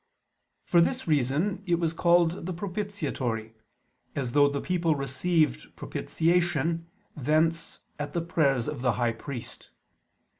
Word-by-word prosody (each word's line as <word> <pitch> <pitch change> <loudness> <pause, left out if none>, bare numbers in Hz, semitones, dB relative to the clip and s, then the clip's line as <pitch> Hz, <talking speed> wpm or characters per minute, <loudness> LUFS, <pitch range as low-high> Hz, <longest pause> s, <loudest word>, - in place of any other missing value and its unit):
For 170 - +4
this 170 - 0
reason 155 +7 +1
it 175 - +3
was 165 -1 0
called 170 0 +2
the 185 - -2
"propitiatory," 165 - -3 0.6
as 130 -4 -2
though 145 +2 +5
the 140 0 -2
people 170 -2 +1
received 140 +2 0
propitiation 165 -1 0 0.3
thence 160 +4 0 0.2
at 145 0 -4
the 170 - 0
prayers 140 -7 +1
of 150 -4 -4
the 125 -2 +2
high 120 -2 0
priest. 120 0 -8
160 Hz, 125 wpm, -27 LUFS, 135-170 Hz, 0.6 s, though